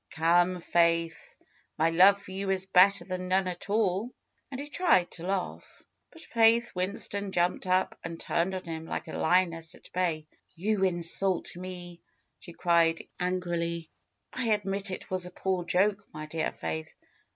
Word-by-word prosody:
^^Come, 175 +2 +2
Faith! 170 -2 +1 0.4
My 160 +1 +2
love 190 +4 +6
for 190 - -12
you 195 +1 -3
is 190 -1 0
better 190 0 +5
than 185 0 -4
none 190 +1 +2
at 180 +2 -6
all." 205 +1 +1 0.4
And 265 - -6
he 285 - -5
tried 290 - +2
to 175 +1 -6
laugh. 190 -1 -4 0.3
But 330 - -13
Faith 230 +1 +3
Winston 200 +1 -2
jumped 175 +1 0
up 185 +1 +1
and 170 0 -6
turned 175 +3 0
on 185 - -5
him 160 -1 -6
like - - -4
a - - -7
lioness 165 -1 +1
at - - -18
bay. 170 -4 0 0.3
^'You 195 +1 +1
insult 175 +1 0
me!" 175 -1 -8 0.4
she 175 - -11
cried 170 -1 +2
angrily. 170 -2 -2 0.4
admit 205 -5 0
it 185 - -7
was 185 -1 0
a - - -10
poor 185 0 -1
joke, 195 +3 +2
my 155 0 -7
dear 160 +1 -2
Faith." 80 -1 -5
180 Hz, 160 wpm, -29 LUFS, 170-195 Hz, 0.4 s, love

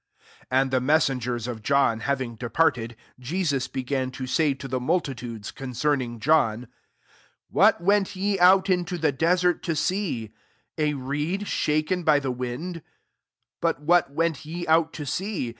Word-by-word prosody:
And 130 +1 +2
the 130 -1 +2
messengers 125 -5 +1
of 115 -3 -5
k 140 +6 0
liaving 130 -2 0
departed, 120 -2 0 0.3
Je9ua 145 -1 -1
he 130 -1 -3
reto 130 -1 -3
say 145 +1 +1
to 135 - -8
the 130 0 -2
multitudes 125 - -3
' 135 +1 -6 0.2
ng 120 -2 -6
John, 125 -4 +2 0.4
" - - -33
What - - +4
went 200 +1 +1
into 185 -2 +3
the 160 -3 +1
desert 175 +5 +2
to 165 - -2
see? 155 - -2 0.4
coed 150 +6 -2
shaken 155 +1 0
by 155 -3 +4
the 135 -2 -2
wind?: 125 +8 -5 0.8
what 165 +3 +2
went 160 -1 -1
ye 170 +3 -5
out 160 0 +3
to 150 - -6
see 185 - -3
145 Hz, 140 wpm, -25 LUFS, 125-170 Hz, 0.8 s, What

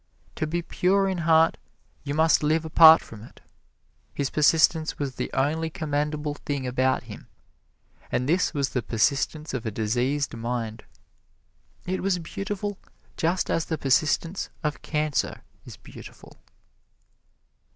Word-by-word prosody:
To 155 - -1
be 170 +2 -2
pure 195 +3 +1
in 190 -2 -2
heart 160 0 +4 0.5
you 140 0 -3
must 160 0 +4
live 155 +2 +1
apart 160 0 +8
from 105 -2 -12
it. 115 - -14 0.8
His 140 -1 -2
persistence 160 +1 +3
was 140 -2 -3
the - - -5
only 155 +4 0
commendable 150 -1 -2
thing 140 -2 -4
about 130 +1 0
him, - - -11 0.8
and 125 - -1
this 175 +4 +2
was 140 -3 -1
the 125 - -2
persistence 140 +7 -1
of 125 -4 -3
a 110 - -2
diseased 125 +7 -1
mind. 115 -1 -4 1.0
It 185 +1 -2
was 195 -1 +1
beautiful 195 +4 -5 0.4
just 170 +3 0
as 165 - 0
the 160 - -3
persistence 155 +6 0
of 150 -1 -2
cancer 150 -2 -2 0.2
is - - -10
beautiful. - - -14
150 Hz, 135 wpm, -25 LUFS, 135-165 Hz, 1.0 s, apart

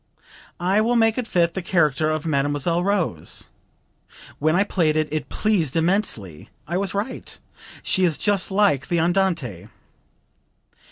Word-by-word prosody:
'I 190 +4 +2
will 235 +2 +1
make 225 +1 +3
it 245 - -3
fit 170 -4 +1
the 190 - -3
character 155 -4 +1
of 155 0 -2
Mademoiselle 145 +3 0
Rose.' 180 - -2 0.9
When 155 +2 +2
I 195 - +4
played 165 -6 +1
it, 155 -1 +1
it 155 -1 -3
pleased 185 -11 0
immensely....I 165 - -2
was 195 +1 -1
right; 205 +6 -4 0.5
she 190 - 0
is 165 -5 +2
just 205 -2 0
like 190 -9 +2
the 170 - +1
Andante." 165 - 0
170 Hz, 135 wpm, -22 LUFS, 155-195 Hz, 0.9 s, I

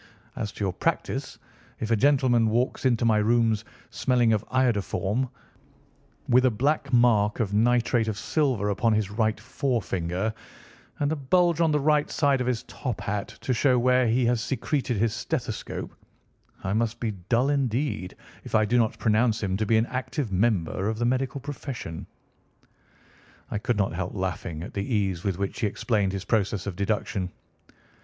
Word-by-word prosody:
As 105 -2 -3
to - - -5
your 95 - -1
practice, - - -2 0.4
if 110 0 -3
a - - +5
gentleman 125 -2 +3
walks 120 +4 0
into 120 -2 +1
my 110 -2 +4
rooms 110 0 +2 0.3
smelling 120 -3 +2
of 105 0 0
iodoform, 120 -1 0 1.0
with 125 +1 +5
a - - +6
black 140 +5 0
mark 115 -4 +3
of 105 -4 -1
nitrate 120 +1 +2
of 110 -2 -2
silver 120 -5 0
upon 110 +3 +2
his 105 -2 0
right 110 -1 0
forefinger, 110 - -2 0.7
and 145 0 +1
a - - +1
bulge 170 +4 +2
on 165 -2 +3
the 150 - +2
right 150 +1 +2
side 140 -3 +2
of 125 - -1
his 125 -1 -1
top 125 -6 -5
hat 100 0 -3
to 130 - 0
show 125 +1 +3
where 125 0 +3
he 120 +2 +2
has 120 -1 +2
secreted 130 0 -1
his 110 +1 +1
stethoscope, 110 - -4 0.7
I 95 0 -1
must 115 +1 0
be 115 -2 -1 0.2
dull, 125 +4 +3
indeed, 130 -7 -1 0.3
if - - -4
I 110 0 +4
do 120 +3 +2
not 110 -2 +1
pronounce 110 0 +2
him 95 -1 0
to 110 0 -1
be 110 - +4
an 110 - +3
active 130 -1 -3
member 95 -1 +1
of 110 - -2
the 120 - 0
medical 130 +2 0
profession." 135 - -6 1.4
I 105 - -1
could 115 +1 -1
not 100 -4 +1
help 90 +3 -4
laughing 90 -4 -3
at - - -8
the 100 - -2
ease 95 -4 0
with 95 -3 -1
which 100 0 -3
he 110 - +1
explained 105 -2 0
his 95 -1 -5
process 105 -3 0
of 100 -3 -4
deduction. 100 -2 -2
115 Hz, 175 wpm, -26 LUFS, 105-130 Hz, 1.4 s, a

